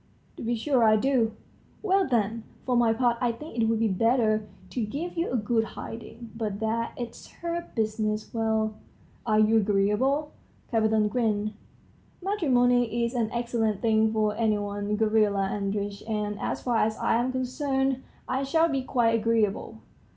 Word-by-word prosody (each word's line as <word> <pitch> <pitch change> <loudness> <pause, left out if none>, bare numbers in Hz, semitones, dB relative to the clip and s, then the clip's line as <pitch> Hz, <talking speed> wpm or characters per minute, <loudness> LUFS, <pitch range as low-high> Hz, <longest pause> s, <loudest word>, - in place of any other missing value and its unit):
"To - - -8
be 235 +1 0
sure 250 +1 +2
I 215 -1 +6
do." 235 -1 +2 0.5
"Well, 390 -2 +3
then. 230 -2 0 0.2
For 250 - +1
my 240 -2 +4
part 235 0 +1
I 245 -1 +2
think 300 +8 -9
it 230 -2 +2
would 225 0 +2
be 225 0 +2
better 215 +1 +2 0.2
to 245 - -2
give 290 +12 -4
you 335 0 -1
a 250 - 0
good 225 +1 +1
hiding. 230 +1 -8
But 215 -3 -3
there 225 +1 -1
it's 240 -1 -7 0.2
her 340 0 -2
business. 215 -1 -1
Well? 220 -1 0 0.5
are 215 -1 +3
you 215 +1 +5
agreeable?" 215 +9 +1 0.4
Kapiton 220 -2 +3
grinned. 215 -2 0 0.7
"Matrimony 245 - +2
is 235 - -3
an 235 -3 0
excellent 235 -3 -1
thing 220 -1 +3
for 215 -1 +1
any 220 -1 +2
one, 205 0 -2
Gavrila 210 -3 +2
Andreitch; 200 0 -2
and, 210 -1 -2
as - - -3
far 240 -2 +1
as 220 0 +1
I - - +2
am 245 +2 0
concerned, 265 +1 -1 0.3
I 260 +1 0
shall 320 +5 +2
be 275 -3 0
quite 240 -3 +2
agreeable." 225 -2 0
225 Hz, 165 wpm, -27 LUFS, 215-250 Hz, 0.7 s, I